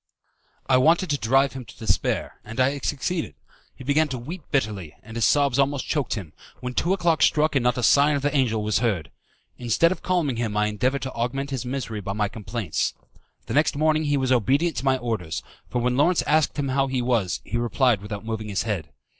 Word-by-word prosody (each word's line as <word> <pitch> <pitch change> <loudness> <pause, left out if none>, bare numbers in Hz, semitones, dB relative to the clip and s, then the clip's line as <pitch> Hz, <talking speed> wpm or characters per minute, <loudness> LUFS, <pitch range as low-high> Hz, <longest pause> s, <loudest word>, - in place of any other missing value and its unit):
I 130 - +4
wanted 165 +6 +3
to 145 - +1
drive 135 +5 +3
him 130 -1 -6
to 105 - -15
despair, 110 - -1
and 115 +4 -8
I 130 +1 +4
had 140 -1 -6
succeeded. 150 - -2 0.4
He - - -11
began 145 +4 +2
to 130 -3 -4
weep 165 +10 -7
bitterly, 105 - -2
and 110 +1 -11
his 115 -3 +2
sobs 140 +5 +3
almost 140 0 +1
choked 140 -8 -1
him, 95 -8 -7 0.3
when 125 0 -5
two 170 - 0
o'clock 175 -4 +2
struck 155 -1 +3
and 130 - +2
no - - +6
sign 140 +5 +4
of 140 - -2
the 145 0 0
angel 115 -6 +1
was 105 0 +1
heard. 110 -9 -1 0.5
Instead 125 +8 +3
of 185 - -4
calming 165 -9 0
him 110 -3 -2
I 105 - +3
endeavoured 125 +6 0
to 130 - -4
augment 135 +4 -2
his 130 -2 -3
misery 125 -5 -4
by 100 0 -4
my 105 0 0
complaints. 105 -4 -3 0.5
The - - -5
next 150 +1 +3
morning 155 +1 +2
he 145 -1 +2
was 130 -1 0
obedient 135 - +2
to 130 - -3
my 135 -1 +3
orders, 90 - -3 0.3
for 125 - -1
when 125 0 +1
Lawrence 170 +5 +3
asked 155 0 +2
him 140 -2 -1
how 135 +1 +1
he 130 -2 -1
was, 115 -8 0
he 120 - -3
replied 120 -2 +2
without 105 +1 -6
moving 110 -1 -4
his 100 - -1
head. 95 -8 -3
130 Hz, 220 wpm, -24 LUFS, 110-145 Hz, 0.5 s, no